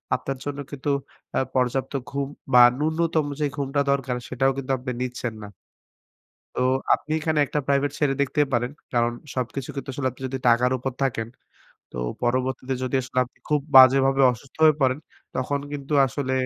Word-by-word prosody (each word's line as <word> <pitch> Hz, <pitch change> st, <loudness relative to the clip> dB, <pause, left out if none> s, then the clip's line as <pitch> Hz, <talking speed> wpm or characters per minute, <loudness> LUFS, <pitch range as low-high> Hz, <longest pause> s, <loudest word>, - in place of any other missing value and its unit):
আপনার 135 Hz, +1 st, -4 dB
জন্য 145 Hz, 0 st, -4 dB
কিন্তু 145 Hz, 0 st, -2 dB, 0.5 s
আ -, -, +4 dB, 0.2 s
পর্যাপ্ত 130 Hz, +2 st, 0 dB, 0.2 s
ঘুম 140 Hz, 0 st, -2 dB, 0.3 s
বা 125 Hz, -, +9 dB, 0.2 s
ন্যূনতম 160 Hz, 0 st, +1 dB
যে, 150 Hz, -, +1 dB
ঘুমটা 140 Hz, 0 st, 0 dB
দরকার 135 Hz, -2 st, 0 dB
সেটাও 135 Hz, +1 st, +1 dB
কিন্তু 135 Hz, 0 st, -3 dB
আপনি 125 Hz, +1 st, -5 dB
নিচ্ছেন 125 Hz, -2 st, -3 dB
না। -, -, -7 dB, 1.1 s
তো -, -, -2 dB, 0.3 s
আপনি 155 Hz, -, -3 dB
এখানে 155 Hz, -1 st, 0 dB
একটা 150 Hz, -, -2 dB
প্রাইভেট 140 Hz, 0 st, +2 dB
ছেড়ে 145 Hz, -3 st, +2 dB
দেখতেই 145 Hz, +1 st, +1 dB
পারেন। 120 Hz, +1 st, 0 dB, 0.2 s
কারণ 120 Hz, -1 st, +2 dB, 0.2 s
সবকিছু 130 Hz, +1 st, -3 dB
কিন্তু 140 Hz, 0 st, -6 dB
আসলে 130 Hz, 0 st, -1 dB
আপনি 130 Hz, -, -18 dB
যদি 135 Hz, +1 st, -4 dB
টাকার 120 Hz, +1 st, +4 dB
উপর 130 Hz, +2 st, -3 dB
থাকেন 115 Hz, -4 st, -1 dB, 0.7 s
তো -, -, -10 dB, 0.3 s
পরবর্তীতে 130 Hz, +2 st, -1 dB
যদি 130 Hz, +1 st, -2 dB
আসলে 130 Hz, 0 st, -4 dB
আপনি 125 Hz, -, -21 dB
খুব 150 Hz, -1 st, +2 dB, 0.2 s
বাজেভাবে 135 Hz, +1 st, +7 dB
অসুস্থ 125 Hz, +3 st, -13 dB
হয়ে 155 Hz, -2 st, +6 dB
পড়েন 130 Hz, 0 st, +2 dB, 0.4 s
তখন 130 Hz, +3 st, -1 dB
কিন্তু 145 Hz, 0 st, -5 dB
আসলে 130 Hz, +1 st, -3 dB
135 Hz, 170 wpm, -24 LUFS, 125-140 Hz, 1.1 s, বা